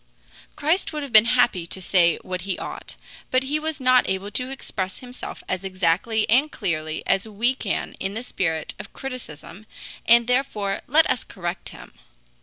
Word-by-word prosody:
Christ 325 +3 +1
would 300 -2 -4
have 275 -4 -8
been 215 0 +9
happy 235 -8 +2
to 190 - -5
say 175 -2 +3
what 185 0 -4
he 190 0 -2
ought, - - -7 0.3
but 255 0 +2
he 290 +3 -1
was 315 0 -3
not 255 -1 +4
able 190 +2 -2
to 250 +3 -1
express 200 -8 -4
himself 250 0 -8
as 185 0 -2
exactly 190 +4 +1
and 270 +7 +4
clearly 155 -6 -2
as 195 +3 +1
we 225 +4 +1
can 225 -6 -3
in 195 +1 -3
the 230 - -4
spirit 160 -9 -2
of - - -9
criticism, 215 - -8 0.4
and 235 0 +7
therefore 220 -6 0
let 310 +4 +5
us 245 - 0
correct 175 0 -5
him. - - -13
215 Hz, 175 wpm, -24 LUFS, 185-255 Hz, 0.4 s, been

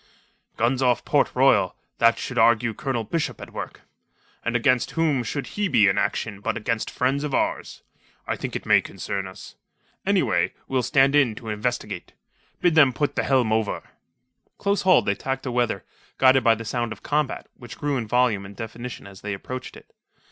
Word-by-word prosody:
"Guns 125 +3 +1
off 125 -2 +2
Port - - +3
Royal... - - +4 0.2
that 115 0 +5
should 125 -2 -3
argue 115 0 +4
Colonel 120 +1 -2
Bishop 165 +8 -2
at - - -10
work. - - -7 0.6
And 120 - -1
against 125 +1 +2
whom 155 -5 +2
should 135 +4 -3
he 205 0 +1
be 110 - +4
in 95 +1 +2
action 105 0 -2
but 110 +1 -1
against 115 0 -2
friends 135 +3 0
of 150 -3 -1
ours - - -2 0.4
I - - -1
think - - -5
it - - -4
may - - +5
concern 95 -1 -5
us. 95 - -11 0.5
Anyway, - - +1
we'll 130 -1 +1
stand 135 +3 +3
in 130 -7 +4
to 110 0 -8
investigate. 110 +4 -3 0.5
Bid 175 - +3
them 145 -5 +6
put 145 +3 -1
the - - +1
helm 125 -5 +2
over." 110 -1 -2 0.7
Close 200 -1 0
hauled 185 0 +5
they 100 - +2
tacked 135 +5 -4
aweather, 120 -6 0 0.3
guided 130 0 +5
by 115 -2 +5
the 115 +1 -8
sound 120 0 -2
of 110 - -9
combat, 150 -2 -1
which 120 -1 -11
grew 145 -2 -1
in 115 -3 -3
volume 125 -4 +2
and 100 +1 -10
definition 115 +3 -7
as 95 -1 -12
they 105 -1 -3
approached 130 +6 -7
it. - - -18
120 Hz, 185 wpm, -24 LUFS, 110-135 Hz, 0.7 s, them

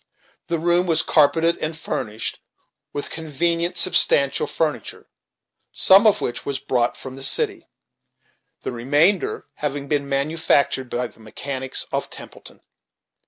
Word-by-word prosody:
The 170 - -1
room 175 +2 +1
was 160 -2 +2
carpeted, 160 +3 +3
and 155 +1 -4
furnished 110 -8 -4 0.5
with 145 - -5
convenient, 170 +3 -1
substantial 140 -5 +3
furniture, 150 -9 -3 0.7
some 195 +4 +5
of 210 -1 +3
which 120 - -3
was 140 -1 -3
brought 125 -3 -1
from 130 - -8
the 135 - -10
city, - - 0 0.9
the - - -4
remainder 160 - +2
having 145 -1 -3
been 140 -1 -1
manufactured 140 -2 +1
by 125 +1 -2
the 115 - -12
mechanics 130 +4 -3
of - - -2
Templeton. - - -11
145 Hz, 125 wpm, -22 LUFS, 135-170 Hz, 0.9 s, some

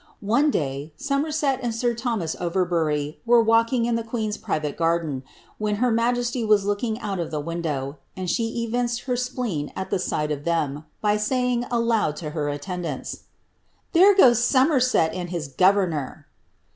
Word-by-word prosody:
One 245 +9 +3
day, 145 - -2
Somerset 280 -1 0
and 235 -3 -2
sir 240 +1 +1
Thomas 225 -9 -2
Overbury 165 -5 0
were 240 0 +5
walking 230 +2 +3
in 240 - 0
the 230 - 0
queen^s 220 -2 -3
private 155 -9 -2
garden, 165 -5 0 0.4
when 210 -1 0
her 245 +3 +1
majesty 240 +1 0
was 210 -2 +3
looking 215 +2 -1
out 195 -3 -3
of 170 - -2
the 155 - -3
window, 150 -3 -3 0.2
and 185 -1 -4
she 225 +5 -1
evinced 240 +1 -1
her 250 -2 -2
spleen 240 - -3
at 190 - -5
the 195 - +1
sight 150 -4 -1
of 145 -1 -3
them, 155 -3 -1 0.2
by 210 0 +2
saying 245 +2 0
aloud 230 -9 +1
to 150 -2 -6
her 150 -2 -2
attendants, 155 0 -4
^^ - - -18 0.7
There 380 +4 +7
goes 240 - +6
Somerset 255 - +3
and 180 -1 -4
his 170 -5 -3
governor! 180 -3 +1
210 Hz, 165 wpm, -24 LUFS, 160-240 Hz, 0.7 s, There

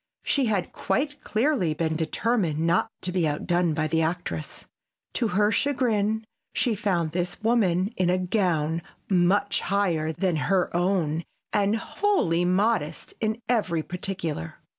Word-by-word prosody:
She 275 -2 +2
had 205 -6 0
quite 290 +1 -1
clearly 220 - +1
been 160 0 -1
determined 170 +1 0
not 165 +2 +2
to 180 - -2
be 175 -3 +1
outdone 170 +2 0
by 155 0 0
the 160 +1 +1
actress. 160 - -3 0.5
To 235 - +1
her 210 +2 +2
chagrin 220 -6 +1 0.3
she 240 - +2
found 190 -6 0
this 175 +4 -3
woman 205 -3 +2
in 180 -1 +1
a 180 - +3
gown 175 -4 0 0.3
much 195 +3 +3
higher 175 -5 +1
than 170 +1 0
her 185 -3 +1
own 175 -3 +1 0.3
and 205 +1 +2
wholly 225 - +1
modest 185 -4 0
in 220 +1 -1
every 190 -9 +1
particular. 175 - -4
180 Hz, 140 wpm, -26 LUFS, 165-215 Hz, 0.5 s, a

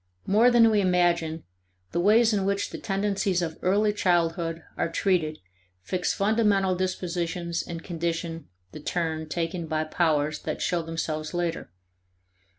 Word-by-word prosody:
More 220 +5 +5
than 235 -2 +6
we 210 -1 +3
imagine, 170 -3 +1 0.5
the - - -1
ways 220 +5 +5
in 200 -2 +1
which 200 +1 -1
the - - -6
tendencies 195 -2 0
of 160 -1 -5
early 205 +3 +2
childhood 165 -3 0
are - - -1
treated 165 -3 0 0.5
fix 180 - -1
fundamental 200 -2 +2
dispositions 175 -2 -2
and 165 -1 -7
condition 165 -1 -3 0.2
the - - -9
turn 160 -1 -2
taken 165 +1 -3
by 155 0 0
powers 155 -2 0
that - - -4
show 175 -1 0
themselves 160 -1 -4
later. 175 -1 -2
175 Hz, 140 wpm, -26 LUFS, 165-195 Hz, 0.5 s, than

